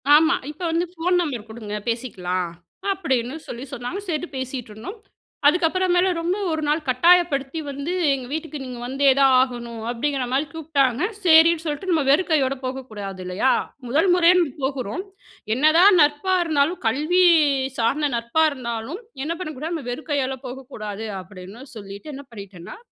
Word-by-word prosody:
ஆமா, 320 +3 +5 0.2
இப்ப 305 - -16
வந்து 335 +2 +1
ஃபோன் 360 +1 0
நம்பர் 250 -10 -4
குடுங்க 220 -2 -6
பேசிக்கலாம் 185 -7 -2 0.4
அப்டின்னு 265 -9 -1
சொல்லி 240 +2 -6
சொன்னாங்க. 245 +9 -4
சேரின்ட்டு 330 -2 -3
பேசிட்டுருந்தோம். 260 - -6 0.5
அதுக்கப்புறமேல 355 +3 +3
ரொம்ப 345 +4 -1
1 315 -1 -1
நாள் 300 +2 +2
கட்டாயப்படுத்தி 285 +1 +3
வந்து 280 +4 -4 0.2
''எங்க 265 -2 -2
வீட்டுக்கு 310 -1 -4
நீங்க 250 -2 -7
வந்தே 275 +2 +2
தான் 270 -1 +5
ஆகணும்'' 235 -3 -4
அப்டிங்கிற 265 +3 -1
மாரி 275 +4 +1
கூப்ட்டாங்க. 280 -6 0 0.2
சரின்னு 325 0 +6
சொல்ட்டு 300 +4 -3
நம்ம 320 -4 +2
வெறுக்கையோட 285 -3 +3
போகக்கூடாது 215 -8 -6
இல்லையா? 185 +9 +1 0.4
முதல் 315 +10 +2
முறையா 355 0 +5
நம்ம 320 -7 0
போகுறோம். 265 - -2 0.5
என்னதான் 335 +8 +6
நட்பா 295 +6 +2
இருந்தாலும். 315 +1 +1
கல்வி 305 +10 +2 0.6
சார்ந்த 280 +6 +1
நட்பா 235 +7 +1
இருந்தாலும் 250 - -5 0.2
என்ன 320 - -2
பண்ணக்கூடாது? 310 0 -5
நம்ம 300 -6 -6
வெறுக்கையால 270 -1 -2
போகக்கூடாது. 225 -5 -7 0.2
அப்டின்னு 190 +5 -11
சொல்லிட்டு 200 +7 -9
என்ன 280 +1 -10
பண்ணிட்டேன்னா 195 -5 -10
275 Hz, 140 wpm, -22 LUFS, 235-320 Hz, 0.6 s, சரின்னு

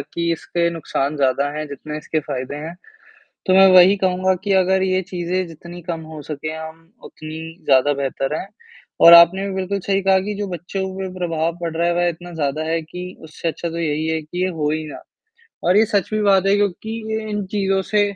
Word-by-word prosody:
कि 170 0 -3
इसके 170 +1 -1
नुकसान 155 -3 -2
ज़्यादा 140 0 +1
हैं, 155 0 -3
जितने 150 +2 -7
इसके 155 +1 -2
फ़ायदे 135 -1 -5
हैं। 160 +3 -6 0.7
तो 185 - +3
मैं 195 0 +8
वही 185 +2 +7
कहूँगा 185 -1 +1
कि 200 - +1
अगर 190 0 +3
ये 185 0 +1
चीज़ें 180 0 -3
जितनी 170 +2 -11
कम 165 -1 -4
हो 155 - -7
सकें, 155 +1 -5
हम 160 +2 -10
उतनी 160 +2 -9
ज़्यादा 135 +1 +4
बेहतर 135 0 -2
हैं, - - -6 0.5
और 170 - +9
आपने 170 +3 +7
भी 195 - -4
बिल्कुल 190 +1 -2
सही 195 +1 0
कहा 190 0 +4
कि 205 +2 -4
जो 205 - -2
बच्चों 180 +2 -5
के 190 0 -3
ऊपर 185 - -7
प्रभाव 165 -1 -1
पड़ 170 -1 -3
रहा 170 +1 +1
है 175 - +1
वह 175 0 +2
इतना 175 +1 -7
ज़्यादा 150 -1 -1
है 165 +1 0
कि, 180 +3 -8
उससे 160 +1 -5
अच्छा 170 +1 -4
तो 165 0 -5
यही 155 -1 -1
है 160 0 0
कि 175 +4 -5
ये 185 - +1
हो 155 -4 -1
ही 155 +1 -2
ना। - - -9 0.6
और 180 +3 +4
ये 220 - +5
सच 205 -3 0
भी 215 - +1
बात 195 -2 +4
है 195 +1 +4
क्योंकि 205 +1 -1 0.2
ये 220 0 -3
इन 205 -1 -2
चीज़ों 195 -2 +1
से 210 -1 +4
170 Hz, 220 wpm, -20 LUFS, 155-190 Hz, 0.7 s, और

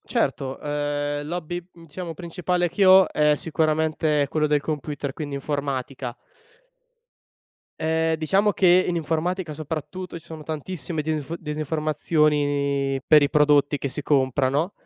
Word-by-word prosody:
Certo, 135 -1 -1
ehm, 145 0 -2
l'hobby 175 +1 -4
diciamo 165 +1 -8
principale 175 +1 -1
che 195 +4 +1
ho 190 0 +7
è 150 0 +3
sicuramente 155 -1 +1
quello 155 -1 +1
del 150 -1 +2
computer, 145 -2 -4
quindi 145 -2 -6
informatica. 135 -3 -3 1.7
Ehm, 160 0 +1
diciamo 195 +6 +2
che 185 -1 +5
in 175 - -1
informatica 165 +1 -2
soprattutto, 165 +4 -6
ci 165 - -18
sono 160 -2 -8
tantissime 155 0 -4
difi 155 +1 -3
disinformazioni, 150 -3 0
per 150 -2 +7
i 145 - +2
prodotti 145 -1 +3
che 140 - -3
si 135 +3 -5
compra, 130 -2 +2
no? 155 +8 0
155 Hz, 130 wpm, -24 LUFS, 145-165 Hz, 1.7 s, ho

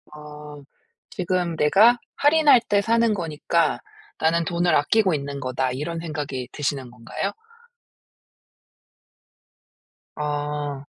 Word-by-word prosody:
어 150 -1 -11 0.5
'지금 180 -2 -2
내가 205 +11 +5 0.2
할인할 290 -4 +5
때 205 -1 +3
사는 230 0 +2
거니까 165 -2 0 0.4
나는 165 +1 +1
돈을 170 -1 +1
아끼고 190 +6 +2
있는거다.' 140 -3 -2
이런 155 +6 -4
생각이 145 -6 -5
드시는 140 -3 -3
건가요? 125 - -4 2.8
아. 145 -1 -3
155 Hz, 200 characters per minute, -23 LUFS, 145-185 Hz, 2.8 s, 내가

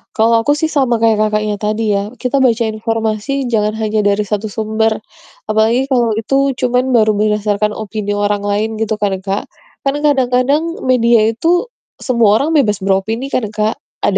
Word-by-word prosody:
Kalau 225 +1 +3
aku 290 - +2
sih 320 - +1
sama 260 -7 +1
kayak 220 -2 +3
Kakaknya 210 0 -1
tadi 210 0 -1
ya, 200 +2 -3
kita 265 +1 0
baca 235 -2 +2
informasi 225 +4 -2
jangan 215 -3 +1
hanya 215 -1 0
dari 205 0 +1
1 210 0 -3
sumber. 220 +1 -1 0.5
Apalagi 220 +5 +2
kalau 240 -4 +1
itu 275 +5 +1
cuman 250 0 0
baru 220 -3 +3
berdasarkan 210 0 0
opini 210 -1 -4
orang 205 0 -1
lain 210 +2 -1
gitu 220 0 -2
kan, 200 -2 0
Kak. 195 +1 -3 0.4
Kan 275 - +2
kadang-kadang 280 +3 +1
media 235 -3 +3
itu 335 +10 +1 0.3
semua 230 -4 +2
orang 315 - -1
bebas 215 -11 +1
beropini 220 +7 -1
kan, 235 -4 0
Kak. 215 +1 -1 0.2
Ada 195 - +2
220 Hz, 165 wpm, -15 LUFS, 210-250 Hz, 0.5 s, Kalau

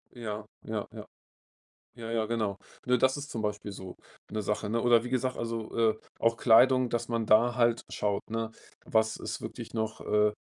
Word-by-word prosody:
Ja, 110 -3 -5 0.2
ja, 110 -2 -3
ja. - - -9 0.9
Ja, 115 -1 -7
ja, 110 -1 +1
genau. 110 -3 -1 0.3
Ne, 125 0 +4
das 130 +3 +3
ist 145 0 -6
zum 115 - -3
Beispiel 105 -1 -3
so 95 -2 -9 0.3
'ne 110 0 -2
Sache, 105 +1 -1
ne? 115 - +1
Oder 120 -2 +5
wie 125 - -5
gesagt, 130 0 0
also, 115 -1 -4
äh, 110 -1 +3 0.2
auch 115 0 +3
Kleidung, 125 +2 +5
dass 120 -1 -1
man 115 -2 -1
da 115 +3 +5
halt 120 -1 +3
schaut, 100 -1 -1
ne, 115 0 -2 0.3
was 110 0 +2
ist - - -5
wirklich - - -7
noch, 110 -1 -2
äh, 105 0 +3
äh, 105 - -3
115 Hz, 195 wpm, -29 LUFS, 110-120 Hz, 0.9 s, Oder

